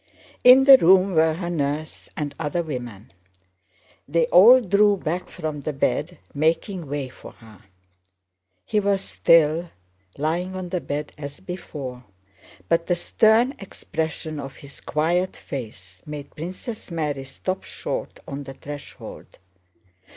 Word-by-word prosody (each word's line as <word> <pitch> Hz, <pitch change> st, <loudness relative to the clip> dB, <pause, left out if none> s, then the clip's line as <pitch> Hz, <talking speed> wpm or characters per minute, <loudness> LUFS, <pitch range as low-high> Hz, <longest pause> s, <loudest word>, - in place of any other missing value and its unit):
In 255 Hz, +2 st, +9 dB
the 270 Hz, 0 st, +10 dB
room 190 Hz, +3 st, +5 dB
were 160 Hz, -1 st, +3 dB
her 175 Hz, 0 st, -4 dB
nurse 150 Hz, -1 st, -3 dB
and 145 Hz, -1 st, -3 dB
other 165 Hz, +2 st, -1 dB
women. 120 Hz, -10 st, -7 dB, 0.9 s
They 165 Hz, +3 st, +2 dB
all 215 Hz, +10 st, +8 dB
drew 205 Hz, -1 st, +3 dB
back 175 Hz, +1 st, -3 dB
from 155 Hz, -4 st, -5 dB
the 150 Hz, +2 st, -3 dB
bed, 135 Hz, -, -1 dB, 0.2 s
making 165 Hz, +3 st, 0 dB
way 140 Hz, -1 st, -3 dB
for -, -, -13 dB
her. 110 Hz, -2 st, -17 dB, 1.0 s
He 210 Hz, -, +1 dB
was 200 Hz, -1 st, +1 dB
still 165 Hz, -1 st, +3 dB, 0.5 s
lying 175 Hz, +5 st, -1 dB
on 185 Hz, -1 st, -5 dB
the 180 Hz, -1 st, -2 dB
bed 145 Hz, +1 st, -4 dB
as 145 Hz, -1 st, -7 dB
before, 145 Hz, -9 st, -7 dB, 0.6 s
but 165 Hz, 0 st, +1 dB
the 175 Hz, -, +2 dB
stern 220 Hz, +8 st, +3 dB
expression 160 Hz, -4 st, -5 dB
of 135 Hz, -1 st, -7 dB
his 140 Hz, -1 st, -13 dB
quiet 170 Hz, +5 st, 0 dB
face 100 Hz, -8 st, -8 dB
made 150 Hz, -1 st, -8 dB
Princess 185 Hz, +8 st, -7 dB
Mary 150 Hz, -5 st, -2 dB
stop 185 Hz, +8 st, -4 dB
short -, -, -5 dB
on 140 Hz, 0 st, -6 dB
the 135 Hz, -1 st, -9 dB
threshold. 145 Hz, 0 st, -10 dB
160 Hz, 135 wpm, -23 LUFS, 145-185 Hz, 1.0 s, the